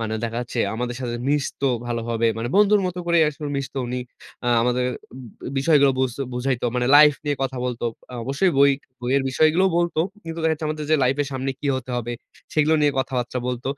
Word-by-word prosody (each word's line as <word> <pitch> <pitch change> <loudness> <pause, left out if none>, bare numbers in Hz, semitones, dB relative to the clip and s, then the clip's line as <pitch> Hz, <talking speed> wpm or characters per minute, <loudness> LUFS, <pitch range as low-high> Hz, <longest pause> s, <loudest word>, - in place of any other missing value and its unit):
মানে 110 -1 -3
দেখা 115 0 -2
যাচ্ছে 120 0 -6 0.2
আমাদের 120 +1 -3
সাথে 120 -2 -3
মিশত 145 -1 -1 0.3
ভালোভাবে, 115 -1 -1
মানে 115 - -2
বন্ধুর 210 0 +5
মত 180 - -4
করেই 170 -1 +4
আসলে 150 0 -6
মিশত 140 0 -4
উনি। 125 +1 -3 0.4
আ - - +1
আমাদের 125 +1 +1 0.7
বিষয়গুলো 140 -1 +4
বুঝ 130 -2 +1 0.2
বুঝাইত। 125 0 -1
মানে 125 0 +1
লাইফ 150 0 +8
নিয়ে 145 -1 0
কথা 135 -1 -2
বলত। 125 -2 -3 0.3
আ - - -6
অবশ্যই 140 +8 +1
বই 140 0 +7 0.3
বইয়ের 130 +3 +1
বিষয়গুলোও 155 +7 +3
বলত। 175 0 0 0.3
কিন্তু 165 0 -6
দেখা 160 - +3
যাচ্ছে 155 0 -3
আমাদের 155 0 -3
যে 155 - +5
লাইফ 130 +2 +2
এর 140 - -5
সামনে 135 +1 -2
কি - - -3
হতে 130 -1 -6
হবে? 120 0 -3 0.4
সেগুলো 155 +1 +3
নিয়ে 145 -1 +3
কথাবার্তা 125 -1 -2
বলত। 125 -1 -3
135 Hz, 195 wpm, -23 LUFS, 125-150 Hz, 0.7 s, লাইফ